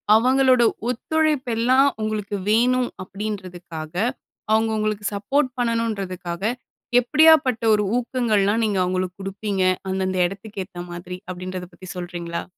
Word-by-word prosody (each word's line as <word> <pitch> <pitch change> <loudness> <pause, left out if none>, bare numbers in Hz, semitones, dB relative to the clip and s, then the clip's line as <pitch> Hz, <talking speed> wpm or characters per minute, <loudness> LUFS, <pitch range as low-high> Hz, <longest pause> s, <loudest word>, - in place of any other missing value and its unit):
அவங்களோட 255 +1 +4 0.3
ஒத்துழைப்பெல்லாம் 260 -2 +2
உங்களுக்கு 210 -1 -2
வேணும் 245 +3 +3
அப்டீன்றதுக்காக, 185 -5 -6 0.6
அவங்க 220 +1 +3
உங்களுக்கு 215 -1 -1
சப்போட் 260 +7 +1
பண்ணணுன்றதுக்காக 200 -7 -2 0.6
எப்படியாப்பட்ட 295 -3 +5
ஒரு 210 - +1
ஊக்கங்கள்லாம் 230 -4 +1
நீங்க 205 -2 0
அவங்களுக்கு 185 0 -2
குடுப்பீங்க? 195 0 -2 0.3
அந்தந்த 190 0 -1
எடத்துக்கேத்த 190 -2 -7
மாதிரி, 175 +1 -7
அப்டீன்றத 185 0 -6
பத்தி 185 +1 -12
சொல்றீங்களா? 175 -1 -5
210 Hz, 100 wpm, -23 LUFS, 185-245 Hz, 0.6 s, எப்படியாப்பட்ட